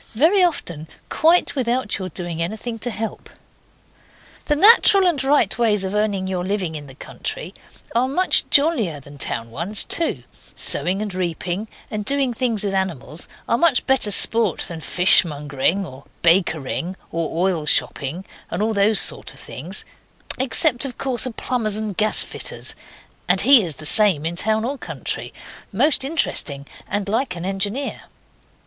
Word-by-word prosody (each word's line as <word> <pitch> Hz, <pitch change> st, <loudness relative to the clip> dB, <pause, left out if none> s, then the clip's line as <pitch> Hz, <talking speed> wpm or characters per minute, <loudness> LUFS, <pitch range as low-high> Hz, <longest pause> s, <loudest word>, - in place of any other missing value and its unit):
Very 340 Hz, -, +3 dB
often 170 Hz, -, -2 dB, 0.2 s
quite 330 Hz, +2 st, +2 dB
without 245 Hz, -4 st, -1 dB
your 185 Hz, -1 st, -5 dB
doing 170 Hz, -1 st, -6 dB
anything 220 Hz, +6 st, -5 dB
to 245 Hz, -, -4 dB
help. 220 Hz, -1 st, -6 dB, 1.2 s
The 295 Hz, -, +1 dB
natural 400 Hz, +2 st, +6 dB
and 315 Hz, -7 st, 0 dB
right 270 Hz, -7 st, +2 dB
ways 210 Hz, -4 st, +2 dB
of 190 Hz, +1 st, -4 dB
earning 210 Hz, -2 st, -1 dB
your 185 Hz, -1 st, -3 dB
living 190 Hz, -3 st, -3 dB
in 145 Hz, -2 st, -8 dB
the 135 Hz, -, -14 dB
country -, -, -7 dB, 0.4 s
are 245 Hz, +2 st, +1 dB
much 360 Hz, +8 st, +1 dB
jollier 260 Hz, -, +2 dB
than 140 Hz, +1 st, -15 dB
town 115 Hz, -3 st, -2 dB
ones, 175 Hz, -, 0 dB
too; 335 Hz, -, 0 dB, 0.3 s
sowing 195 Hz, +4 st, +2 dB
and 205 Hz, -3 st, -6 dB
reaping, 180 Hz, +3 st, -4 dB, 0.2 s
and 210 Hz, -1 st, -4 dB
doing 270 Hz, +2 st, +1 dB
things 230 Hz, -3 st, 0 dB
with 200 Hz, -1 st, -2 dB
animals, 175 Hz, -5 st, -3 dB, 0.2 s
are 235 Hz, -, 0 dB
much 325 Hz, -7 st, +2 dB
better 265 Hz, -5 st, +3 dB
sport 220 Hz, -1 st, +6 dB
than 165 Hz, -2 st, -6 dB
fishmongering 160 Hz, 0 st, +1 dB
or 135 Hz, -3 st, -13 dB, 0.2 s
bakering 170 Hz, 0 st, 0 dB, 0.2 s
or 165 Hz, -1 st, -4 dB
oil 165 Hz, -5 st, -3 dB
shopping, 150 Hz, +6 st, -1 dB, 0.2 s
and 215 Hz, +6 st, -2 dB
those 205 Hz, +1 st, +2 dB
sort -, -, -1 dB
of -, -, -13 dB
things, -, -, -5 dB, 0.5 s
except, 260 Hz, +1 st, +3 dB
of 270 Hz, -3 st, -5 dB
course, 255 Hz, -2 st, +2 dB
a -, -, -5 dB
plumber's 225 Hz, -2 st, -2 dB
and 215 Hz, -3 st, -5 dB
gasfitter's, 215 Hz, +2 st, -1 dB, 0.5 s
and -, -, +2 dB
he 275 Hz, -4 st, +7 dB
is 165 Hz, -7 st, -1 dB
the 155 Hz, -, -7 dB
same 185 Hz, -4 st, +6 dB
in 170 Hz, +1 st, -3 dB
town 220 Hz, +4 st, +2 dB
or 275 Hz, +2 st, -4 dB
country -, -, -5 dB, 0.4 s
most 265 Hz, +8 st, +2 dB
interesting 165 Hz, -, 0 dB, 0.2 s
and 205 Hz, 0 st, -3 dB
like 220 Hz, -1 st, -2 dB
an 170 Hz, +1 st, -7 dB
engineer. 200 Hz, +8 st, -3 dB
205 Hz, 155 wpm, -20 LUFS, 170-250 Hz, 1.2 s, he